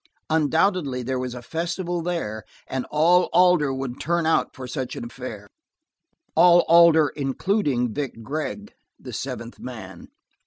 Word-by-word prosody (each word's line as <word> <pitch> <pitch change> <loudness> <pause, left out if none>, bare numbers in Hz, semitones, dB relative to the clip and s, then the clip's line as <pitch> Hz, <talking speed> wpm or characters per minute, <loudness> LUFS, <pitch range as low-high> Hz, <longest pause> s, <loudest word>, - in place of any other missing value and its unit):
Undoubtedly, 160 -3 +1
there 130 +1 -2
was 125 -1 -4
a 120 - -8
festival 175 +4 -3
there, 160 -12 -3 0.2
and 130 -1 -4
all 170 +4 +3
Alder 180 -5 +4
would 130 -2 -5
turn 170 +2 0
out 160 - +2
to 130 - -8
such 125 0 -4
an - - -6
affair. 115 -4 -8 0.9
All 175 -1 +7
Alder, 165 -3 +6
including 135 - -1
Vic 130 -4 -5
Gregg, 155 - -5 0.3
the - - -9
seventh - - -6
man. - - -9
150 Hz, 140 wpm, -24 LUFS, 125-170 Hz, 0.9 s, All